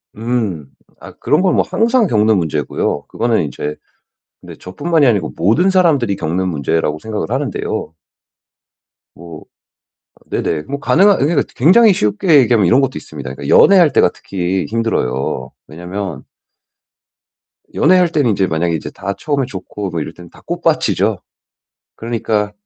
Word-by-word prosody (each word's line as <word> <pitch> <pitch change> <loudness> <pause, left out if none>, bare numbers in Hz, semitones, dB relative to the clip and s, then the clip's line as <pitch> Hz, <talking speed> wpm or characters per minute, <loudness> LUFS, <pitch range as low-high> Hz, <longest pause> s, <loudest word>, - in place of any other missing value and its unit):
음. 110 - -3 0.3
아 - - -11
그런 150 - 0
건 185 -1 +2
뭐 - - +3
항상 230 0 +2
겪는 110 - +2
문제고요. 75 -5 -2
그거는 115 -5 0
인제 75 +1 -5 0.7
근데 - - -11
저뿐만이 150 - -1
아니고 105 -9 +1
모든 115 - +2
사람들이 155 - +2
겪는 90 +1 -2
문제라고 75 -1 -1
생각을 105 -4 -5
하는데요. - - -3 1.2
뭐 85 -2 -11 0.9
네네. 75 - -2
뭐 140 - -6
가능한 195 +7 +4
그러니까 145 0 +1
굉장히 200 - +5
쉽게 145 - +2
얘기하면 115 -5 +3
이런 125 +10 +4
것도 135 -1 0
있습니다. 70 -4 -8
그러니까 70 +1 -1
연애할 180 -7 +6
때가 90 - +3
특히 95 0 -3
힘들어요. 90 - -2 0.2
왜냐면 90 -1 -6 1.5
연애할 180 +2 +3
때는 145 -7 +1
인제 95 -2 0
만약에 85 +1 -1
이제 80 - -5
다 100 - -5
처음에 145 -3 -1
좋고 100 0 -7
뭐 80 - -3
이럴 80 - -6
때는 85 -1 -14
다 - - -19
꽃밭이죠. - - 0 0.8
그러니까 110 -2 -2
105 Hz, 330 characters per minute, -16 LUFS, 85-140 Hz, 1.5 s, 연애할